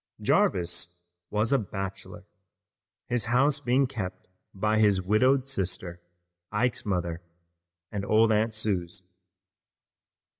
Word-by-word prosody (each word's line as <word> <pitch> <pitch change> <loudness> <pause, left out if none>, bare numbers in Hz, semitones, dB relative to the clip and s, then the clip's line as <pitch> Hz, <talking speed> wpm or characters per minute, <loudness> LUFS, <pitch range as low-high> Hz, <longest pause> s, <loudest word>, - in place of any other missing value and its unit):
Jarvis 90 0 +1 0.3
was 105 +4 +1
a 135 - +4
bachelor, 95 -2 -6 0.8
his 120 -2 0
house 135 +5 +3
being 135 0 +2
kept 95 -8 -6 0.2
by 105 +2 0
his 105 -3 +4
widowed 125 +8 +3
sister, 90 -7 -3 0.5
Ike's 115 +2 0
mother, 85 -3 -1 0.7
and 100 -1 -3
old 110 +2 +4
Aunt 110 +1 +1
Suse. 95 -3 -2
105 Hz, 105 wpm, -27 LUFS, 95-120 Hz, 0.8 s, a